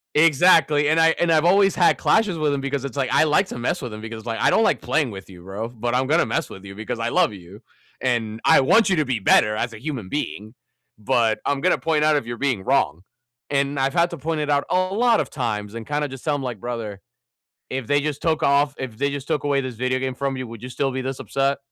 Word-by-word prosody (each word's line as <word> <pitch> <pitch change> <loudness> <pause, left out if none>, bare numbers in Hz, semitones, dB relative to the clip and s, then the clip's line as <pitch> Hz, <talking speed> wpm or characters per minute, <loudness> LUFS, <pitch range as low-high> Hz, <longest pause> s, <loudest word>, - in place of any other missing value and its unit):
Exactly, 155 -1 +4
and 160 +1 +3
I 165 0 +5
and 170 -1 +2
I've 155 +1 +3
always 195 +1 +4
had 175 - +3
clashes 210 -5 +2
with 155 -2 0
him 140 - -1
because 140 0 -3
it's, 140 0 -5
like 130 -2 0
I - - +4
like 160 +6 +2
to - - -7
mess 120 - -1
with 120 -5 -6
him 110 - -9
because, 110 0 -8
like, 115 -1 -3
"I - - +4
don't 225 - +3
like - - +1
playing 145 -7 0
with 95 -1 -10
you, 90 -2 -13
bro, 100 +5 -5
but 120 0 -3
I'm 130 +1 +1
gonna 160 +5 +2
mess 165 -4 -2
with 95 - -11
you 100 - -9
because 110 +3 -5
I 115 0 -1
love 115 - +2
you, 95 +1 -12 0.4
and 115 -4 -1
I - - +6
want 190 +10 +4
you 190 - +2
to 155 -2 +1
be 125 -4 -1
better 105 +2 +4
as 115 +2 -2
a 110 - -10
human 130 -11 -5
being, 110 -6 -4 0.4
but 110 +1 +1
I'm 140 -1 0
gonna 185 - +2
point 160 -2 0
out 155 -1 +4
if 135 -5 -2
you're 120 0 -5
being 130 -6 -1
wrong," 85 -1 0 0.4
and 140 0 0
I've 135 +2 0
had 170 0 +2
to 170 - -7
point 155 +2 -2
it 150 - -2
out 145 -1 +2
a - - +1 0.2
lot 230 +2 +3
of - - -4
times 105 -6 -3
and 115 -1 -7
kinda 150 0 -1
just 135 -1 -10
tell 150 - +1
him 145 - -3
like, 120 -6 -5
"Brother, 115 -5 -5 0.7
if 130 -3 -5
they 145 0 +3
just 145 -1 -4
took 160 -2 0
off 140 0 +2
if 125 -4 -6
they 140 +4 0
just 140 -1 -6
took 155 -2 -1
away 145 -1 +1
this 130 -2 -5
video 130 +2 -1
game 130 0 -3
from 135 +1 -3
you, 130 -1 -5
would 115 -2 -11
you 125 - -6
still 135 +1 -2
be 130 - -3
this 130 0 -4
upset?" 135 0 -1
135 Hz, 270 wpm, -22 LUFS, 115-150 Hz, 0.7 s, I